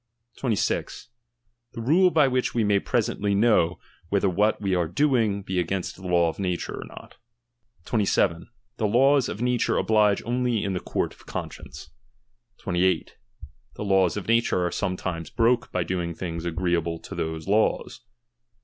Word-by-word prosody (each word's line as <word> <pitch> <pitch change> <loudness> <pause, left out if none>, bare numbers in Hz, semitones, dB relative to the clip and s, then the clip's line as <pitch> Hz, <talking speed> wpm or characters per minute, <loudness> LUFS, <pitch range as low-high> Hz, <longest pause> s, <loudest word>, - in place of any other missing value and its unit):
26 115 -2 -2 0.6
The 115 - -6
rule 170 +10 +4
by 155 -5 +4
which 130 -1 -1
we 115 - +2
may 105 -1 +3
^^^Bresently 100 0 0
know, 100 -6 +3 0.3
whether 100 0 +2
what 105 +4 +1
we 95 -2 -1
are 90 -2 +1
doing 110 - +1
be 95 -1 -2
against 90 +1 -2
the - - -15
law 85 -2 +2
^^^W - - -17
nature 90 -3 -2
or - - -7
not. - - -13 0.7
27, 95 -6 +1 0.3
The 110 - +1
laws 135 +4 +3
of 105 - -6
natnre 125 -1 +1
oblige 105 -2 +2
only 120 -2 0
in 100 - -1
the 90 - -2
^^^Bonrt - - -2
of - - -21
conscience. - - -7 0.7
28. 90 -1 0 0.6
The - - -5
laws 95 -2 +2
of 105 - -5
nature 115 -6 +2
are 90 - -1
sometimes 90 -4 -3
^^Hbroke 120 +1 +1
by 90 - 0
doing 85 -1 -3
things 85 -1 -5
agreeable 85 -1 -1
to - - -10
those 80 0 -4
laws. 105 +2 +1
100 Hz, 160 wpm, -25 LUFS, 90-115 Hz, 0.7 s, rule